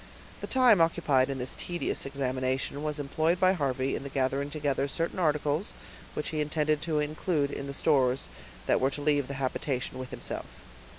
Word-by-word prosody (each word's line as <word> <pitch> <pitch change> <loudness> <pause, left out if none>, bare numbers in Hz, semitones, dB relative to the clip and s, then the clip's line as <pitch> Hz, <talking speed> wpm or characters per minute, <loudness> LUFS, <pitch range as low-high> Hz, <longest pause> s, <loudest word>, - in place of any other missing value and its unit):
The - - -4
time 250 -8 +5
occupied 150 -6 +3
in 135 - -2
this 125 0 -3
tedious 175 -5 -3
examination 130 0 -1
was 150 0 -2
employed 155 +4 +1
by 185 0 +5
Harvey 135 -5 0
in - - -4
gathering 135 +1 0
together 140 -2 0
certain 165 +6 -2
articles 150 +2 +1 0.4
which 150 - -2
he 155 -2 -1
intended 150 0 +1
to 160 -1 -1
include 150 0 0
in 140 - -5
the 140 - -5
stores 135 -3 +2 0.4
that - - +2
were 135 - +4
to 145 - -6
leave 145 -3 +2
the 140 - -5
habitation 130 -1 -2
with 130 -1 -6
himself. - - -5
145 Hz, 175 wpm, -29 LUFS, 135-155 Hz, 0.4 s, time